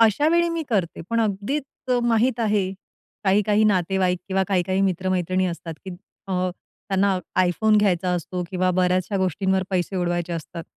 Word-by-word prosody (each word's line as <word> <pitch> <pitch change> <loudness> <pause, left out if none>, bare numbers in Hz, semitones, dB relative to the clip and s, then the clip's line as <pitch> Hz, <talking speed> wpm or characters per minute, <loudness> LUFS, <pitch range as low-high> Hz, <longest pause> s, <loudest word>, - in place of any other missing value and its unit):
अशा 230 +7 +4
वेळी 340 +1 +3
मी 335 -1 -2
करते 190 -7 -1
पण 230 - +2
अगदीच 240 +7 -3
माहीत 235 +1 +2
आहे 205 -4 +1 0.5
काही 200 +2 +4
काही 210 +1 +2
नातेवाईक 185 -2 +2
किंवा 190 0 +1
काही 185 -3 +2
काही 190 +2 -1
मित्र-मैत्रिणी 185 -1 0
असतात 170 -2 -5
की 190 - -6
त - - -6 0.4
अ, 185 0 0 0.4
त्यांना 195 -1 +2 0.3
iPhone 215 +5 +2
घ्यायचा 185 -3 +1
असतो 180 +1 -3
किंवा 185 -1 +1
बऱ्याचशा 185 +2 +1
गोष्टींवर 190 +1 +1
पैसे 185 0 -1
उडवायचे 175 -1 -1
असतात. 165 +1 -6
190 Hz, 160 wpm, -23 LUFS, 180-210 Hz, 0.5 s, अशा